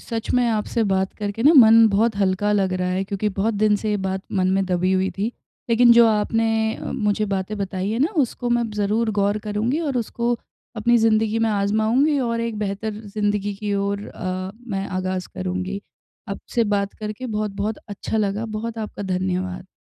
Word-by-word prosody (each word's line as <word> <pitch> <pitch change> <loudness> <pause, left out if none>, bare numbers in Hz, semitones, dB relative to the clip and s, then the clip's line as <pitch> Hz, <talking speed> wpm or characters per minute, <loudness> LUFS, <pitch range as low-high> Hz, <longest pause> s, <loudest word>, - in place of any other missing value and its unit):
सच 225 -2 -4
में 250 -1 +3
आपसे 225 +1 0
बात 190 0 +1
करके 205 +1 -4
ना 295 +5 +7
मन 225 -2 +8
बहुत 220 +2 +2
हल्का 200 +1 +1
लग 195 -2 +1
रहा 185 0 -1
है 185 +1 0
क्योंकि 200 +2 -2
बहुत 220 +3 +1
दिन 210 0 +3
से 215 +1 -3
ये 210 - +1
बात 190 0 -2
मन 185 -1 +1
में 195 0 +2
दबी 185 0 +1
हुई 190 0 +1
थी। 210 +4 0 0.4
लेकिन 235 +1 +6
जो 235 0 +7
आपने 225 +1 +1 0.3
अ, - - -9
मुझे 210 0 0
बातें 190 +2 -3
बताई 190 0 -2
है 225 - -1
ना 290 +5 +3 0.2
उसको 245 +1 -5
मैं 240 -1 +1
ज़रूर 210 +2 +1
गौर 205 +1 +1
करुँगी 225 +9 0
और 265 - -2
उसको 235 +1 -1 0.4
अपनी 240 +2 +3
ज़िंदगी 220 0 +2
में 225 0 +2
आज़माऊँगी 220 +8 +2
और 230 -2 -1
एक 230 -2 -3
बेहतर 210 +1 -3
ज़िंदगी 205 0 -1
की 205 0 -2
ओर 200 +1 -2
अ, 185 0 -4 0.2
मैं 195 -2 -2
आगाज़ 185 0 -3
करुँगी। 185 +2 -3 0.5
आपसे 225 +4 -2
बात 200 0 -1
करके 215 +4 -6
बहुत-बहुत 210 -1 -2
अच्छा 205 +2 -4
लगा, 210 0 0
बहुत 225 +1 -5
आपका 210 -1 -5
धन्यवाद। 185 -1 -2
210 Hz, 190 wpm, -22 LUFS, 195-225 Hz, 0.5 s, मन